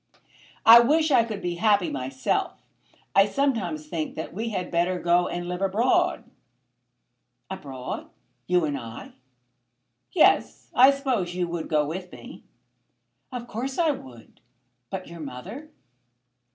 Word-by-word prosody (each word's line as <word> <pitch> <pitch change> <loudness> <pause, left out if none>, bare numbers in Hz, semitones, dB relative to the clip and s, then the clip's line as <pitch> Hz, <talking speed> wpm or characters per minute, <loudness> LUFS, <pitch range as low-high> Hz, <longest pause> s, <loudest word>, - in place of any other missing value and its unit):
"I 230 +1 +11
wish 310 +6 +3
I 245 -4 +5
could 215 -3 -6
be 175 -1 -2
happy 205 -4 +3
myself. 130 -1 -2 0.5
I 195 +1 +6
sometimes 205 - -1
think 155 0 -4
that 160 - -6
we 225 +5 -3
had 185 -4 -4
better 175 +2 +1
go 175 +1 +2
and 175 0 -4
live 180 +1 -4
abroad." 210 +6 +1 1.3
"Abroad! 135 -9 -6 0.4
You 180 -2 +2
and 145 -2 -2
I?" 115 0 -9 1.0
"Yes. 345 - +2
I 260 +2 +7
suppose 255 -11 -1
you 180 -1 -1
would 170 -1 -4
go 150 -2 +2
with 180 +4 -6
me?" - - -11 0.9
"Of 245 -2 -5
course 260 +5 -4
I 330 -3 +3
would. 125 - -11 0.5
But 190 -1 -5
your 170 0 -10
mother?" 155 - -8
180 Hz, 135 wpm, -25 LUFS, 165-235 Hz, 1.3 s, I